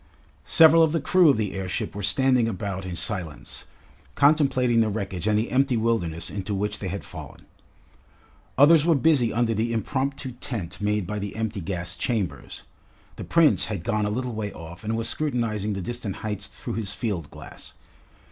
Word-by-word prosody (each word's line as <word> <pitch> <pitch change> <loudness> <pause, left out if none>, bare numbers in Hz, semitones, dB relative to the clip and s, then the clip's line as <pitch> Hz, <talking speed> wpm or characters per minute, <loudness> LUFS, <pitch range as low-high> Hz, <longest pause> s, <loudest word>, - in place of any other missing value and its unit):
Several 165 0 +7
of 160 -1 +3
the 165 - +1
crew 180 -1 +4
of 135 - +4
the 105 -3 -2
airship 95 -1 -3
were 105 - -6
standing 125 +4 +2
about 95 -3 -4
in 90 - -5
silence, 85 -6 -4 0.5
contemplating 135 -5 +3
the 110 - +2
wreckage 100 -3 -4
and 105 -1 +3
the 110 +2 -1
empty 130 -1 +2
wilderness 105 -8 -1
into 100 0 -3
which 105 +1 -2
they 100 - -4
had 100 +2 -5
fallen. - - -11 1.1
Others 150 +3 +7
were 165 0 +3
busy 135 -5 +3
under 115 0 +1
the 115 +2 -1
imromptu 130 +4 -2
tent 100 -8 -5
made 105 -1 0
by 105 +3 -4
the 100 0 -5
empty 110 -2 -3
gas 85 0 -4
chambers. 95 - -3 0.5
The - - -6
Prince 165 -3 +4
had 100 -6 -4
gone 105 -1 0
a - - -1
little 125 +3 -3
way 105 -2 -3
off 85 +2 -10
and 110 +1 -2
was 115 0 -1
scrutinising 115 -8 -1
the 95 -2 -4
distant 120 -2 -4
heights 105 -2 -3
through - - -7
his 105 -3 -3
field 100 - -3
glass. - - -12
110 Hz, 180 wpm, -25 LUFS, 100-125 Hz, 1.1 s, Several